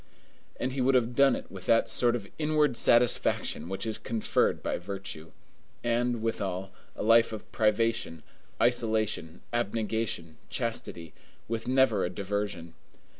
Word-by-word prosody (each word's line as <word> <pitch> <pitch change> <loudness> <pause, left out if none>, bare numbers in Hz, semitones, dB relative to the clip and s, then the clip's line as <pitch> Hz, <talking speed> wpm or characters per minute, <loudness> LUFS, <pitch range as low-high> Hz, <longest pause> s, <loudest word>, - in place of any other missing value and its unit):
And 130 - -1
he 130 0 -2
would 130 +1 +3
have 120 -1 +2
done 140 +1 +4
it - - -8
with 95 -1 -9
that 115 0 +4
sort 120 +2 +2
of 105 -5 -5
inward 150 -3 +2
satisfaction 120 -9 +3
which 95 +3 -2
is 110 -1 -2
conferred 115 -1 0
by - - -2
virtue. 90 -4 -7 0.5
And, 120 -1 0
withal, 95 -4 -3 0.2
a - - -4
life 115 +1 +5
of 110 -2 -8
privation, 115 -7 0 0.4
isolation, 110 -8 0
abnegation, 110 -7 -2
chastity, 115 -9 -4 0.3
with 115 0 -4
never 130 -6 +3
a - - -1
diversion. 100 -3 -4
115 Hz, 135 wpm, -28 LUFS, 95-120 Hz, 0.5 s, life